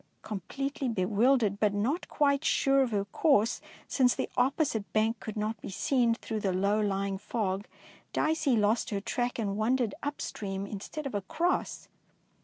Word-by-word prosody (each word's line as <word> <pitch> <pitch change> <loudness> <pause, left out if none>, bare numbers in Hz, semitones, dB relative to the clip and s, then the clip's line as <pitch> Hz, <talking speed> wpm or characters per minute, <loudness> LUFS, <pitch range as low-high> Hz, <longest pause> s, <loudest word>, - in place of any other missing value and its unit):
Completely 270 - -3
be 190 -5 0
wildered, 215 0 +3 0.2
not 260 - 0
quite 280 -1 +2
sure 275 -3 +3
of 260 - +2
her 200 -3 0
course 230 -1 +2 0.3
since 250 -3 +3
the - - -3
opposite 255 -4 +1
bank 220 +1 +2
could 215 -1 -6
not 215 0 -2
be - - -6
seen 235 +3 +2
through 220 -1 -4
the 195 -2 0
low 200 +3 +1
lying 195 -1 -1
fog. 200 -2 -2 0.4
Dicey 310 -4 +2
lost 215 +2 +2
her 200 - -1
track 245 +4 -2
and 200 -4 -1
wandered 235 +1 +1
up 290 0 -3
stream 195 -1 -4
instead 210 +10 -6
of 275 - -4
across. 305 - -1
220 Hz, 160 wpm, -30 LUFS, 200-270 Hz, 0.4 s, wildered